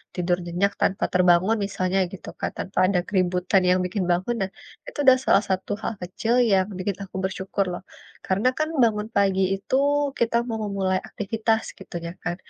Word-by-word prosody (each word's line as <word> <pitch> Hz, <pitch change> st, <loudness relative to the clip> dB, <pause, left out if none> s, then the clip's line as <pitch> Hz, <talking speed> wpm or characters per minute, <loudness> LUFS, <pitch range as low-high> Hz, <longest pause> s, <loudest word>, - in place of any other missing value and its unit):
tidur 175 Hz, 0 st, +1 dB
nyenyak 180 Hz, +4 st, 0 dB
tanpa 190 Hz, -, +1 dB
terbangun 180 Hz, +3 st, +4 dB
misalnya 190 Hz, -1 st, -1 dB
gitu 195 Hz, -, -9 dB
kan, -, -, -2 dB
tanpa 190 Hz, -, -6 dB
ada 185 Hz, -1 st, +2 dB
keributan 185 Hz, 0 st, +2 dB
yang 180 Hz, 0 st, +4 dB
bikin 185 Hz, +1 st, -2 dB
bangun, 185 Hz, +7 st, 0 dB
nah, 190 Hz, -, -3 dB, 0.4 s
itu -, -, -9 dB
sudah 260 Hz, -1 st, +8 dB
salah 195 Hz, -, +4 dB
satu 190 Hz, +1 st, -1 dB
hal -, -, -1 dB
kecil 220 Hz, +6 st, -2 dB, 0.2 s
yang 190 Hz, -1 st, +4 dB
bikin 190 Hz, +1 st, -2 dB
aku 190 Hz, -, -12 dB
bersyukur 190 Hz, +1 st, -1 dB
loh. 175 Hz, -, -5 dB, 0.4 s
Karena 195 Hz, +6 st, +1 dB
kan 310 Hz, -, +1 dB, 0.2 s
bangun 210 Hz, -2 st, +1 dB
pagi 195 Hz, -1 st, +3 dB
itu 195 Hz, +6 st, -3 dB, 0.4 s
kita 235 Hz, 0 st, +1 dB
mau 225 Hz, -2 st, -3 dB
memulai 190 Hz, -2 st, 0 dB
aktivitas 220 Hz, +2 st, -1 dB, 0.2 s
gitunya 170 Hz, -3 st, -6 dB
kan, 175 Hz, -, -2 dB
190 Hz, 175 wpm, -24 LUFS, 185-210 Hz, 0.4 s, sudah